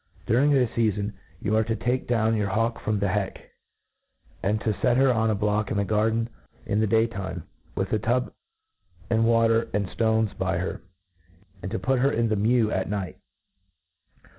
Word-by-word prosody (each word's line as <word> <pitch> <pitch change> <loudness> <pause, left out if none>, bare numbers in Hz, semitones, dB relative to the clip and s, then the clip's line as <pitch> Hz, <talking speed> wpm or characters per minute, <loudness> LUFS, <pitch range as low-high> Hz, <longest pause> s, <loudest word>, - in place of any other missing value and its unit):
During 130 +6 +3
.this 130 -5 +3
feafon, 105 -2 0 0.3
you 105 +1 0
arc 110 0 +2
to 115 - 0
take 125 +4 -1
down 115 -2 +2
your 105 -2 0
hawk 115 +3 0
from 110 0 -1
the 100 -1 0
heck, 95 0 -3 0.9
and 105 +2 0
to 110 - 0
fet 120 +5 +1
her 135 -1 +4
on 110 -1 +1
a 110 - +1
block 105 0 0
in 105 - -1
the 100 - +1
garden 110 +2 +1 0.4
in 105 - 0
the 110 - +2
day 110 +2 +3
time, 100 -5 -5 0.3
with 95 +2 -2
a 110 - +2
tub 120 +4 0 0.8
^^nd 115 0 +3
water 115 0 +3
and 100 -1 +1
ftones 110 -2 +1
by - - 0
her, - - -3 0.8
and 95 - -5
to 115 - -1
put 130 +1 0
her 135 +2 +3
in 115 -2 +1
thp 110 -2 0
me\jr 110 +1 +2
at 95 - -1
night. 100 -3 -4
110 Hz, 190 wpm, -25 LUFS, 105-115 Hz, 0.9 s, her